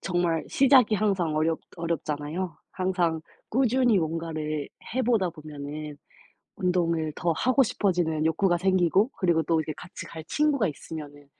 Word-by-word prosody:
정말 175 -3 0
시작이 260 -5 +5
항상 190 -7 +1
어렵 160 +1 +1 0.2
어렵잖아요. 165 0 -3 0.2
항상 180 -4 0 0.3
꾸준히 245 -3 +3
뭔가를 155 -2 -3 0.3
해 260 - +1
보다 220 -7 +2
보면은 150 -1 -7 0.6
운동을 170 -4 0
더 170 -2 +1
하고 255 - +3
싶어지는 175 -8 0
욕구가 175 +2 +2
생기고 190 - +3
그리고 170 -3 +2
또 165 0 +2
이렇게 155 0 -4
같이 175 - -9
갈 160 -1 -8
친구가 285 - +1
있으면은 145 -1 -8
170 Hz, 320 characters per minute, -26 LUFS, 155-195 Hz, 0.6 s, 시작이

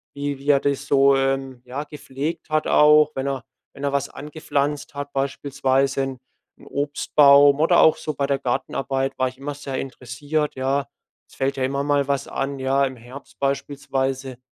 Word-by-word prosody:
wie 140 -1 -3
wie 140 +2 -5
er 140 - +6
das 140 0 -2
so, 140 0 +5
ähm, 135 -1 -1
ja, 130 +4 -5
gepflegt 150 +1 -6
hat 155 0 +1
auch, 150 0 +5
wenn 135 +1 -2
er 135 -3 -3 0.3
wenn 140 - -10
er 140 - -1
was 140 0 0
angepflanzt 145 -1 -3
hat, 145 0 -6
beispielsweise 135 0 0
'n 135 -1 -3 0.4
'n - - -17
Obstbaum 145 0 +4
oder 170 +2 +4
auch 160 - +6
so 155 - -4
bei 140 0 -1
der 140 -1 +1
Gartenarbeit, 135 +1 -2
war 130 - +1
ich 130 - -16
immer 145 +2 -5
sehr 140 -2 -6
interessiert, 140 +4 -3
ja. 135 +1 -1 0.4
Es - - -19
fällt 135 0 -1
ja 135 - -2
immer 140 +2 -1
mal 145 -1 +1
was 140 -1 -1
an, 135 0 -3
ja. 135 +1 +2
Im 130 -1 -5
Herbst 125 +4 -13
beispielsweise 135 -2 -2
140 Hz, 180 wpm, -22 LUFS, 135-145 Hz, 0.4 s, er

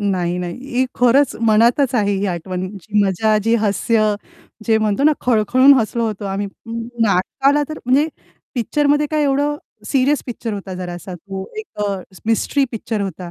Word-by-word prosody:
नाही, 180 -4 0
नाही. 175 -1 -4 0.2
ही 260 - +4
खरंच 250 +3 +4
मनातच 235 +5 +4
आहे 205 -4 +2
ही 195 +1 -1
आठवण 180 +1 -3
जी 205 +3 -1
मजा 215 +3 +2
जी 225 +1 +3
हास्य. 215 0 +2 0.5
जे 220 -1 +4
म्हणतो 215 +2 0
ना, 305 - +6
खळखळून 250 +4 +5
हसलो 235 -1 0
होतो 210 -2 -4
आम्ही 195 +1 -2 0.6
नाटकाला 270 +9 +2
तर 310 - -6
म्हणजे 265 +5 +3 0.5
पिक्चरमध्ये 290 +4 +1
काय 305 -1 +1
एवढं 290 +1 +1 0.3
सीरियस 275 +1 +2
पिक्चर 235 -2 -4
होता 195 -2 -6
जरासा 180 0 -6
तो 190 +2 -7
एक 435 - -9
अ, 200 -2 -2 0.3
मिस्ट्री 230 +5 +2
पिक्चर 225 -1 -3
होता, 185 -2 -5
220 Hz, 160 wpm, -19 LUFS, 195-260 Hz, 0.6 s, ना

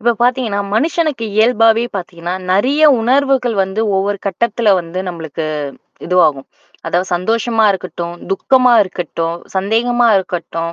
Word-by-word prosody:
இப்ப 235 +2 +2
பார்த்தீங்கன்னா, 240 -5 0
மனுஷனுக்கு 305 -1 0
இயல்பாவே 225 0 +3
பார்த்தீங்கன்னா, 175 -1 -6 0.2
நெறைய 260 +11 +2 0.2
உணர்வுகள் 260 0 +1
வந்து 190 +3 -4 0.2
ஒவ்வொரு 200 +1 -1
கட்டத்ல 220 +3 -1
வந்து 170 +1 -7
நம்மளுக்கு 165 -3 -6 0.6
இதுவாகும். 155 -7 +2 0.4
அதாவது 180 +2 -1
சந்தோஷமா 225 +5 0
இருக்கட்டும், 175 -2 -6 0.2
துக்கமா 250 +5 +3
இருக்கட்டும், 170 -3 -4 0.2
சந்தேகமா 235 +5 +1
இருக்கட்டும், 170 -3 -3
205 Hz, 110 wpm, -16 LUFS, 175-240 Hz, 0.6 s, இயல்பாவே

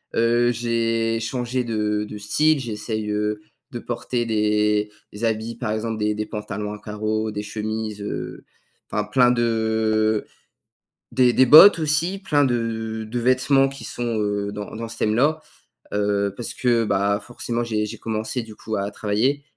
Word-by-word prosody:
heu, 120 +1 +3
j'ai 115 -1 0
changé 125 +2 -2
de 105 -2 -1
de 105 - -7
style, 150 +9 +2
j'essaye, 110 -2 -4
heu, 105 0 -1 0.3
de 120 - -5
porter 120 0 -3
des 105 -1 +1 0.2
des 105 +3 -9
habits, 110 +1 -1
par 115 -2 -3
exemple, 110 +1 -2
des 105 0 0
des 105 0 -3
pantalons 105 -1 -5
à 105 - -6
carreaux, 110 +1 -2
des 105 0 -4
chemises, 110 0 -4
heu, 105 - -5 0.5
enfin 105 0 -1
plein 125 +3 +4
de 110 -2 +1 0.8
des 125 -2 +4
des 130 - +5
bottes 160 +8 +10
aussi, 160 +5 0
plein 150 -7 +2
de 115 -2 -2
de 120 +2 -2
vêtements 130 +3 +3
qui 135 0 -10
sont, 120 -2 -3
heu, 105 -1 -1
dans 105 +1 -7
dans 115 +1 -5
ce 115 0 -9
thème-là. 130 +10 +2 0.5
Heu, 100 -1 0
parce 120 - -5
que, 120 -2 +2
bah, 100 0 +1
forcément, 120 +1 -4
j'ai 110 -2 -1
j'ai 105 - -7
commencé 110 +2 -3
du 110 -2 -11
coup 110 +1 -5
à 100 0 -2
travailler 110 +8 0
110 Hz, 165 wpm, -23 LUFS, 105-120 Hz, 0.8 s, bottes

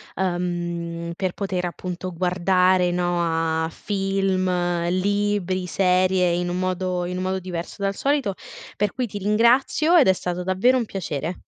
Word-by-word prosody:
uhm, 175 -2 -2
per 185 -1 -2
poter 190 -3 -2
appunto 180 +1 -5
guardare, 180 +1 +2
no, 170 -2 0
a - - -4
film, 195 0 -1 0.4
libri, 190 -1 0
serie 185 0 +2
in 175 +1 -1
un 175 - -2
modo 185 -1 -1
in 180 +1 -4
un 185 - -2
modo 190 0 -1
diverso 175 -2 -6
dal 195 0 +1
solito, 275 -7 0 0.4
per 205 -1 0
cui 255 - -1
ti 205 -2 -6
ringrazio 235 - +3
ed 310 - +6
è 190 - +6
stato 180 -1 -4
davvero 190 +8 +3
un 240 - 0
piacere. 175 -4 -4
185 Hz, 150 wpm, -23 LUFS, 175-195 Hz, 0.4 s, ed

